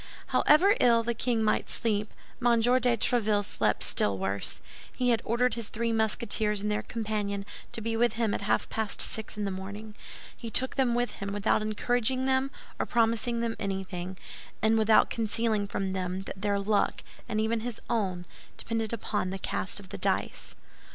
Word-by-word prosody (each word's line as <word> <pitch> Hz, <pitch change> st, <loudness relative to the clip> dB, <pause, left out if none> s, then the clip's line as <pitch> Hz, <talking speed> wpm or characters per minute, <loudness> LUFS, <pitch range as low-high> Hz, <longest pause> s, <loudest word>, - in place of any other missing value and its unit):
However 365 Hz, +7 st, +5 dB
ill 235 Hz, -1 st, +5 dB
the 235 Hz, +1 st, 0 dB
king 230 Hz, -1 st, 0 dB
might 215 Hz, -, +1 dB
sleep, 210 Hz, -2 st, 0 dB, 0.3 s
M. 240 Hz, -1 st, +4 dB
de 245 Hz, +1 st, +3 dB
Tréville 210 Hz, -3 st, +2 dB
slept -, -, +1 dB
still 100 Hz, -1 st, +2 dB
worse. 95 Hz, +1 st, -1 dB, 0.3 s
He 250 Hz, -1 st, 0 dB
had 230 Hz, -2 st, +3 dB
ordered 245 Hz, +2 st, +1 dB
his 230 Hz, -2 st, -3 dB
three 230 Hz, +1 st, -1 dB
Musketeers 220 Hz, -1 st, +1 dB
and 210 Hz, -, 0 dB
their 210 Hz, -, 0 dB
companion 210 Hz, -3 st, -3 dB, 0.3 s
to 230 Hz, -, -3 dB
be 225 Hz, +1 st, -2 dB
with 235 Hz, 0 st, +2 dB
him 225 Hz, -2 st, 0 dB
at -, -, -2 dB
half 200 Hz, -, +1 dB
past 220 Hz, -2 st, -3 dB
six 220 Hz, -1 st, -2 dB
in 210 Hz, -, -1 dB
the 200 Hz, -, -1 dB
morning. 200 Hz, +3 st, -7 dB, 0.4 s
He 230 Hz, -, -7 dB
took 260 Hz, +4 st, +2 dB
them 250 Hz, -3 st, +2 dB
with 245 Hz, 0 st, 0 dB
him, 200 Hz, 0 st, -5 dB
without 205 Hz, +1 st, +1 dB
encouraging 245 Hz, +4 st, 0 dB
them 265 Hz, 0 st, +2 dB, 0.3 s
or -, -, 0 dB
promising 230 Hz, 0 st, +1 dB
them 230 Hz, -1 st, -1 dB
anything, 190 Hz, -2 st, -4 dB, 0.4 s
and 220 Hz, +2 st, +3 dB
without 220 Hz, -1 st, +4 dB
concealing 220 Hz, -2 st, 0 dB
from 195 Hz, -1 st, -2 dB
them 185 Hz, 0 st, -2 dB
that 190 Hz, -1 st, -8 dB
their 205 Hz, -1 st, +1 dB
luck, 200 Hz, +1 st, +1 dB, 0.3 s
and 215 Hz, -, 0 dB
even 220 Hz, +1 st, +1 dB
his 230 Hz, 0 st, -5 dB
own, 190 Hz, -7 st, -1 dB, 0.3 s
depended 225 Hz, -1 st, -2 dB
upon 205 Hz, -4 st, -2 dB
the 190 Hz, -, -3 dB
cast 190 Hz, +1 st, -3 dB
of 195 Hz, -2 st, -13 dB
the -, -, -6 dB
dice. -, -, -1 dB
220 Hz, 180 wpm, -29 LUFS, 200-235 Hz, 0.4 s, However